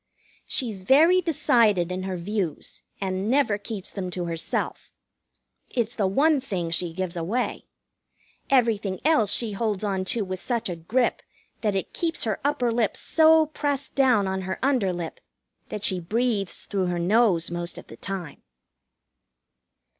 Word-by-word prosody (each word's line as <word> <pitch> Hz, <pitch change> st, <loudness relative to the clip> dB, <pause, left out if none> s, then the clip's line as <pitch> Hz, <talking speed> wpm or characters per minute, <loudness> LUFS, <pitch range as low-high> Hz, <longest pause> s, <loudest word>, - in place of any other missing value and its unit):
She's 225 Hz, -7 st, -2 dB
very 310 Hz, -, +5 dB
decided 225 Hz, -, +3 dB
in 185 Hz, +1 st, -3 dB
her 185 Hz, -, -3 dB
views, 180 Hz, -3 st, -3 dB, 0.2 s
and 190 Hz, +1 st, -2 dB
never 255 Hz, -6 st, +2 dB
keeps 205 Hz, -2 st, -6 dB
them 190 Hz, -3 st, -4 dB
to 180 Hz, -1 st, -4 dB
herself. 165 Hz, -1 st, -3 dB, 0.8 s
It's 235 Hz, -2 st, -1 dB
the 205 Hz, -5 st, +1 dB
one 285 Hz, +8 st, +3 dB
thing 180 Hz, -10 st, -3 dB
she 170 Hz, 0 st, 0 dB
gives 185 Hz, +1 st, -4 dB
away. 195 Hz, +9 st, -2 dB, 0.8 s
Everything 225 Hz, -7 st, +2 dB
else 235 Hz, -11 st, +4 dB
she 225 Hz, 0 st, +1 dB
holds 210 Hz, -1 st, -2 dB
on 195 Hz, -2 st, 0 dB
to 215 Hz, +2 st, -1 dB
with 185 Hz, -1 st, -4 dB
such 235 Hz, -2 st, -1 dB
a 175 Hz, -, -3 dB
grip 230 Hz, +10 st, 0 dB, 0.4 s
that 210 Hz, -3 st, 0 dB
it 195 Hz, -, -3 dB
keeps 330 Hz, -2 st, -1 dB
her 220 Hz, -3 st, -1 dB
upper 265 Hz, -4 st, +1 dB
lip 230 Hz, -2 st, 0 dB
so 320 Hz, 0 st, +5 dB
pressed 285 Hz, -2 st, -3 dB
down 250 Hz, -7 st, +3 dB
on 190 Hz, 0 st, -2 dB
her 190 Hz, 0 st, -3 dB
under 255 Hz, -9 st, +2 dB
lip 175 Hz, -2 st, -5 dB, 0.5 s
that 210 Hz, -, -5 dB
she 185 Hz, -3 st, +1 dB
breathes 210 Hz, +2 st, -1 dB
through 190 Hz, -2 st, -1 dB
her 175 Hz, 0 st, -1 dB
nose 180 Hz, -2 st, +3 dB
most 175 Hz, 0 st, -4 dB
of -, -, -9 dB
the -, -, -12 dB
time. 190 Hz, -5 st, -5 dB
205 Hz, 155 wpm, -25 LUFS, 185-245 Hz, 0.8 s, very